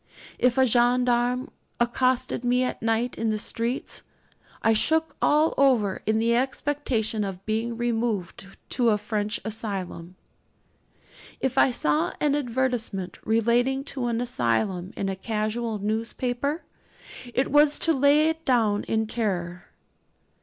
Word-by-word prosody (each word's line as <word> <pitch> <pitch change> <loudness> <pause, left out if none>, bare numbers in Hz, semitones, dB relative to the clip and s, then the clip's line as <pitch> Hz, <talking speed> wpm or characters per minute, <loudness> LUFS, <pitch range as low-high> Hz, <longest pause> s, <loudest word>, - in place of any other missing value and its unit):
If 250 +1 +2
a 265 - +5
gendarme 245 +1 +2 0.3
accosted 245 +1 0
me 250 +1 +2
at 250 - -3
night 225 +2 0
in 225 - 0
the 215 - 0
streets, 230 +4 -2 0.6
I 225 - +4
shook 320 +8 +1
all 305 +2 +3
over 240 -8 +3
in 220 0 +2
the 230 +1 +2
expectation 255 -4 0
of 195 -1 -6
being 225 +2 -2
removed 225 -6 -2 0.2
to 240 -3 +2
a 210 - +3
French 210 0 -2
asylum. 195 -5 -4 1.2
If 265 -1 -1
I 270 - +5
saw 160 -8 +1
an 295 -2 +2
advertisement 245 -8 -2
relating 240 +4 +2
to 260 -3 -2
an 235 0 -1
asylum 175 - -1
in 195 - -2
a 195 - -2
casual 215 +2 -2
newspaper, 245 - -2 0.7
it 260 +2 0
was 295 +1 +5
to 330 - +2
lay 285 +2 +4
it 320 0 -2
down 225 -7 +2
in 220 0 0
terror. 180 -6 -2
235 Hz, 130 wpm, -25 LUFS, 215-255 Hz, 1.2 s, a